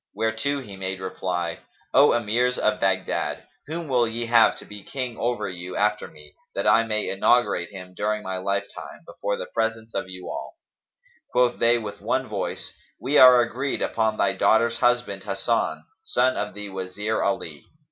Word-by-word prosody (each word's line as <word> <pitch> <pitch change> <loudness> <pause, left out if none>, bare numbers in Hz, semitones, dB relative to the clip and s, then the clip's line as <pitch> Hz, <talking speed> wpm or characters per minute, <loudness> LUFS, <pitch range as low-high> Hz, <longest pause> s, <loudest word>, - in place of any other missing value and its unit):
Whereto 110 +6 -1
he 100 -6 -10
made 95 0 -4
reply, 90 -2 -3 0.3
"O - - +6
Emirs 120 +2 +1
of - - +1
Baghdad, - - -1 0.2
whom 165 +1 -4
will 125 -3 +2
ye 115 +1 -3
have 115 -1 +5
to - - -11
be 105 0 -10
King 130 -2 -4
over 120 +1 -1
you 90 0 -7
after 105 0 +1
me, 75 -1 -16 0.2
that - - -1
I 115 - +6
may 110 -2 -1
inaugurate 95 -3 +2
him 90 -2 -10
during 105 +2 -1
my 95 0 -3
lifetime, 100 +1 -4
before 100 0 -3
the - - -5
presence 115 0 -2
of 95 -1 -3
you 90 -1 -9
all?" - - -6 0.8
Quoth 125 -1 +2
they 120 +1 +4
with 105 -3 -7
one - - 0
voice, - - -4 0.3
"We 135 +6 +2
are 125 -1 +9
agreed 130 +4 -2
upon 110 -1 0
thy 100 -1 +2
daughter's 115 +4 +3
husband 120 -6 +1
Hasan, 100 +3 -1 0.2
son 415 - +1
of 105 0 -3
the 105 -1 -6
Wazir 95 +3 -3
Ali." 80 -7 -2
110 Hz, 170 wpm, -24 LUFS, 95-120 Hz, 0.8 s, are